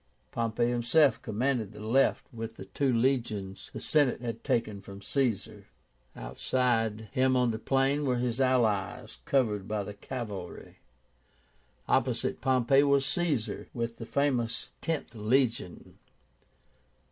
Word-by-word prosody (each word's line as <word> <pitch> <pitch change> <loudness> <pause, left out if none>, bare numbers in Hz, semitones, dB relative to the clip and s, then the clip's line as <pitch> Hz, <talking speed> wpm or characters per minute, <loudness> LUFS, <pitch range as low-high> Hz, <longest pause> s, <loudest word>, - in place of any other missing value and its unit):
Pompey 115 0 0
himself 125 +5 +3
commanded 115 -1 -1
the - - -11
left 115 +6 +2
with 115 0 -6
the - - -9
two 140 -2 0
legions 115 -6 -1
the - - -6
Senate 145 -5 +2
had 115 -1 -5
taken 115 -6 0
from 100 0 -10
Caesar. 120 +1 -2 0.5
Outside 110 - 0
him 130 0 +2
on 125 -2 +3
the 110 - -4
plain 135 +4 +1
were 130 -3 +1
his 125 +1 -1
allies 120 -7 +1
covered 105 -8 +1
by 105 -1 -1
the 105 - -7
cavalry. 105 -4 -7 1.1
Opposite - - +1
Pompey 130 +1 +4
was 140 -1 +3
Caesar, 150 -9 -1
with 115 -1 -3
the 115 - -7
famous 120 -5 0
Tenth 160 -7 -2
Legion. 115 -3 -1
120 Hz, 125 wpm, -29 LUFS, 110-135 Hz, 1.1 s, Pompey